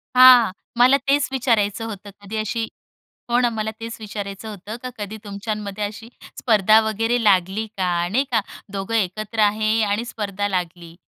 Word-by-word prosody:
हां. 250 -4 +8 0.3
मला 255 +3 +6
तेच 280 0 +3
विचारायचं 230 -5 +1
होतं, 205 -2 -7
कधी 205 +2 -6
अशी 225 +1 -2 0.6
हो 240 +1 +3
ना, 245 -1 +3
मला 220 -1 -3
तेच 230 0 -6
विचारायचं 205 -1 -6
होतं 210 +1 -8
का 255 - -4
कधी 210 +1 -6
तुमच्यामध्ये 205 0 -5
अशी 215 +2 -6 0.3
स्पर्धा 215 -2 +5
वगैरे 225 +3 0
लागली 195 +1 +2
का? 175 -2 0
नाही 245 +8 +2
का, 225 -3 +3 0.3
दोघं 195 +3 -4
एकत्र 215 +2 -2
आहे, 215 +1 +2
आणि 210 +3 0
स्पर्धा 205 -3 -3
लागली? 175 -3 -4
215 Hz, 155 wpm, -22 LUFS, 200-225 Hz, 0.6 s, हां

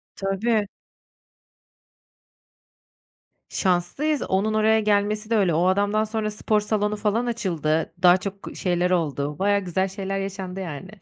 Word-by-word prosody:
Tabii. 205 +2 0 2.8
Şanslıyız, 190 - 0
onun 200 +3 0
oraya 220 +1 +3
gelmesi 210 0 +1
de 230 - +2
öyle. 185 -5 +2
O 170 +3 +2
adamdan 205 +3 +2
sonra 215 0 -2
spor 210 0 0
salonu 210 0 0
falan 210 +3 0
açıldı, 165 -9 -1
daha 180 0 +7
çok 195 +1 -7
şeyler 180 0 0
oldu. 150 -4 -1
Bayağı 200 +1 +3
güzel 190 +1 -1
şeyler 195 0 -4
yaşandı 195 -1 -5
yani. 190 +4 -7
195 Hz, 125 wpm, -24 LUFS, 180-215 Hz, 2.8 s, daha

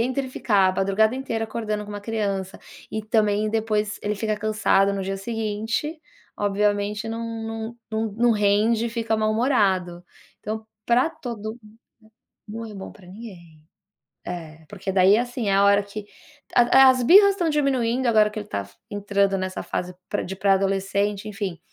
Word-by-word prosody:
entre 260 +2 -1
ficar 200 -6 +2
a - - +1
madrugada 210 +4 +2
inteira 230 -4 -3
acordando 215 -2 -3
com 205 - -10
uma 205 0 -6
criança 200 -3 -3 0.3
e 220 - -3
também 215 -1 +1
depois 215 -1 -1
ele 210 +1 -1
fica 215 +1 -1
cansado 205 -2 +2
no 195 - -3
dia 195 +1 -3
seguinte, 225 +8 -3 0.4
obviamente 205 +1 0
não 225 +1 -4 0.2
não 225 +1 -5
não 220 -1 -2
não 235 +3 +2
rende 215 +2 +2
e - - -4
fica 225 -1 -1
mal-humorado. 210 -6 +1 0.4
Então, 220 +1 -5 0.2
pra 250 +7 +3
todo 225 -6 -6
mun 215 +1 -18 0.7
não 225 +2 -6
é 215 - -10
bom 195 -1 -8
pra 190 - -17
ninguém. 180 -6 -12 0.6
É, 160 -3 -7
porque 195 -1 -5
daí 190 +2 +5
assim, 245 -2 -2
é - - +2
a 195 +1 +4
hora 200 0 +4
que 205 +1 -8 0.5
a 260 +2 +7
as 255 -1 +3
birras 400 - +7
estão 360 -4 -1
diminuindo 260 -4 +1
agora 215 -2 +4
que 215 - -6
ele 210 - -8
tá 100 - -4 0.2
entrando 200 -1 +1
nessa 185 0 -3
fase 180 0 -4 0.2
pra - - -1
de 190 - -6
pré-adolescente, 195 +1 0
enfim. 200 -4 -4
210 Hz, 165 wpm, -24 LUFS, 200-230 Hz, 0.7 s, a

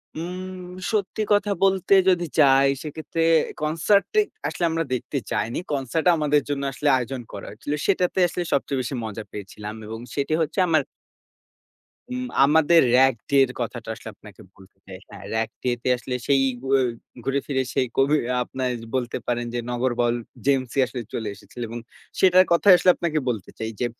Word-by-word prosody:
উম 180 +2 -6 0.2
সত্যি 210 0 -1
কথা 205 0 +2
বলতে 190 0 +3 0.2
যদি 175 -2 +2
চাই, 135 -1 +6
সেক্ষেত্রে 160 +2 -3 0.4
কনসার্টটা 165 - +2 0.3
আসলে - - -4
আমরা 165 0 0
দেখতে 125 +3 -3
চাইনি। 115 +2 -1
কনসার্টটা 145 +6 +1
আমাদের 150 -1 +2
জন্য 140 -1 -2
আসলে 145 +3 0
আয়োজন 130 +1 -4
করা 100 - -7
হয়েছিল। 110 +8 -5
সেটাতে 185 -1 +1
আসলে 175 +1 -3
সবচেয়ে 140 -1 0
বেশি 125 +2 -4
মজা 110 0 -6
পেয়েছিলাম। 105 +1 -8
এবং 110 +1 -6 0.2
সেটি 140 +2 -1
হচ্ছে 160 +5 -1
আমার 160 -2 +3 1.3
উম 255 0 -3 0.2
আমাদের 160 +3 +5
র‍্যাগ 135 +1 +5 0.2
ডে 140 - +3
এর 125 - -8
কথাটা 115 -1 -5
আসলে 110 - -9
আপনাকে 105 +1 -15
বলতে 95 0 -19
চাই। 95 -1 -9
হ্যাঁ, 100 -1 -11
র‍্যাগ 110 0 0
ডে 125 - +1
তে - - 0
আসলে 125 +1 -4
সেই 140 -1 +4 0.3
উ - - -4 0.5
ঘুরে 135 +2 0
ফিরে 130 -2 0
সেই 130 - +1
কবি 140 +3 +4 0.3
আপনারা 130 0 -3 0.2
বলতে 120 -2 -1
পারেন 120 0 -1
যে, 120 - -1
নগর 125 +1 0
বাউল 120 0 +2 0.3
জেমসই 135 -1 +1
আসলে 125 0 -6
চলে 110 -2 -3
এসেছিল। 120 - -12
এবং 120 +1 -5 0.4
সেটার 185 0 +6
কথায় 180 +2 +7
আসলে 180 - +3
আপনাকে 165 -3 -1
বলতে 110 -6 -4
চাই 110 0 -3
যে, 125 - +1
140 Hz, 170 wpm, -24 LUFS, 120-165 Hz, 1.3 s, কথায়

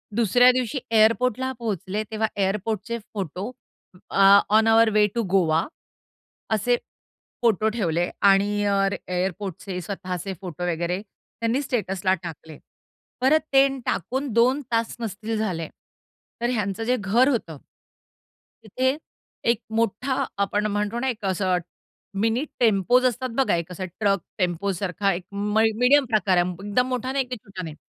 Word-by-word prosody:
दुसऱ्या 245 +3 +5
दिवशी 255 +1 -1
एअरपोर्टला 230 +3 +3
पोहोचले, 210 -2 -3
तेव्हा 220 0 0
एअरपोर्टचे 210 +3 -1
photo 195 - -4 0.6
a, 195 +1 +7
on 220 +1 +4
our 225 0 +5
way 210 -1 +5
to 235 - +1
Goa 165 -4 +3 0.9
असे 220 +3 +2 0.7
फोटो 220 -2 +3
ठेवले. 175 -6 -1
आणि 200 +1 +3
अ, 195 -1 +2 0.2
एअरपोर्टचे 185 0 -3
स्वतःचे 185 0 -5
फोटो 180 -2 -6
वगैरे 170 +3 -2
त्यांनी 230 +4 -4
स्टेटसला 195 -8 -1
टाकले. 160 -2 -9 0.6
परत 285 +5 +5
ते 270 0 +7 0.2
टाकून 265 - -2
2 250 +5 +3
तास 230 0 0
नसतील 220 0 -4
झाले, 180 -7 -2 0.7
तर 240 - +1
ह्यांचं 210 -3 -2
जे 250 +3 +2
घर 225 +7 +3
होतं. 190 - -2 1.1
तिथे, 260 +6 0 0.5
एक 235 -1 -2
मोठा 230 +4 0 0.2
आपण 205 +1 -1
म्हणतो 210 +3 -1
ना, 265 - 0
एक 220 -5 -5
असं 185 -1 +1 0.6
मिनी 225 +5 +1 0.2
टेम्पोज 235 +3 +3
असतात 255 +1 0
बघा, 265 -9 +3
एक 170 +1 -4
असा 185 +1 -5
ट्रक 195 +2 0 0.2
टेम्पोसारखा 190 +1 -1
एक 175 +1 -5
मय 210 +2 +1
मीडियम 270 +3 +5
प्रकार, 200 -5 +2
एकदम 205 +7 -1
मोठा 255 0 -2
नाही, 270 -1 0
की 250 0 -5
छोटा 200 -4 -9
नाही 160 -3 -7
210 Hz, 135 wpm, -24 LUFS, 190-235 Hz, 1.1 s, अ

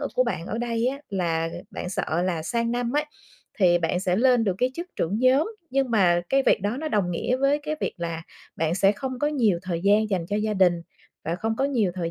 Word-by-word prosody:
ở - - -2
của - - +3
bạn 165 - -3
ở 225 - -3
đây 235 0 -1
á 275 +2 -1
là 165 -4 -1 0.2
bạn - - -5
sợ 175 -2 -1
là 175 -3 -1
sang 230 +8 -1
năm 240 0 -1
ấy 300 - +2 0.5
thì 175 -3 +5
bạn 170 +2 -1
sẽ 180 -1 +1
lên 245 0 +4
được 190 -3 +1
cái 250 +1 +2
chức 345 +4 -5
trưởng 195 +6 -1
nhóm, 265 - +3 0.2
nhưng 270 -2 +1
mà 180 -6 +4
cái 275 0 +3
việc - - +3
đó 210 +5 -1
nó 310 +2 -3
đồng 200 -9 0
nghĩa 245 +8 0
với 275 +2 +2
cái 305 +1 -4
việc - - -1
là 165 -1 -4 0.3
bạn 160 +1 0
sẽ 195 +2 +4
không 260 +3 -5
có 295 - +1
nhiều 230 - +2
thời 175 -2 -3
gian 210 +3 +3
dành 180 -4 -1
cho 205 - -1
gia 215 0 -1
đình, 175 -3 +3 0.4
và 165 - -1
không 225 +3 -2
có 270 - +1
nhiều 230 -10 +1
thời 170 -2 -3
210 Hz, 250 wpm, -25 LUFS, 175-255 Hz, 0.5 s, thì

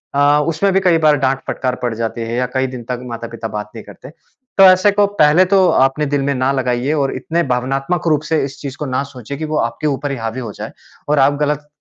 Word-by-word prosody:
अ, 145 +1 +4
उसमें 165 +5 +1
भी 195 - +4
कई 180 -3 +3
बार 155 -2 +4
डाँट, 135 -1 0
फटकार 125 -1 -2
पड़ 120 -2 -1
जाती 115 +1 -3
है 115 +1 -3
या 125 +1 0
कई 130 0 0
दिन 125 -2 -8
तक 125 -1 -2
माता-पिता 115 0 -6
बात 105 -1 -6
नहीं 110 - -8
करते। - - -12 0.5
तो 195 - +7
ऐसे 185 +2 +6
को 205 0 +3 0.2
पहले 150 +5 +5
तो 190 0 +3
अपने 135 0 +2
दिल 145 -1 -1
में 140 +1 0
ना 130 +1 +1
लगाइए 130 +1 -1
और 140 -3 -1
इतने 165 +6 -1
भावनात्मक 135 +7 -1
रूप 150 -2 +2
से 160 -3 +1
इस 140 0 -9
चीज़ 140 -1 -7
को 150 - -4
ना 130 0 -1
सोचिए 130 +1 -8
कि 155 - -4
वो 155 0 -2
आपके 115 +5 -1
ऊपर 140 0 -2
ही 135 - -3
हावी 115 +2 -4
हो 115 -4 -6
जाए - - -7 0.4
और 150 - +3
आप 135 +1 +4
गलत 150 0 -1
140 Hz, 250 wpm, -17 LUFS, 125-150 Hz, 0.5 s, तो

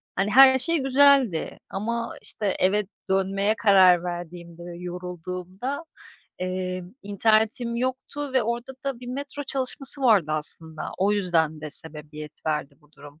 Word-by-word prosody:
hani, 200 +2 0
her 260 +1 +8
şey 335 +5 0
güzeldi 270 - +3
ama, 230 +4 -3
işte, 200 -3 -3
eve 195 +1 +2 0.2
dönmeye 195 +2 +1
karar 185 -5 +6
verdiğimde 175 -1 -7
ve 170 -1 -8
yorulduğumda, 180 - -6 0.6
eee, 185 0 -3 0.2
internetim 220 +3 +1
yoktu 260 +3 -3
ve 260 -3 +3
orada 235 +3 -3
da 270 -3 -3
bir 245 - -9
metro 280 +3 -5
çalışması 275 +1 -3
vardı 195 -11 +4
aslında. 155 +1 -5
O 200 +2 +3
yüzden 165 -6 +1
de 155 -1 -6
sebebiyet 150 -1 -9
verdi 150 -2 -2
bu 150 +1 -27
durum. 145 +2 -15
195 Hz, 135 wpm, -25 LUFS, 175-245 Hz, 0.6 s, her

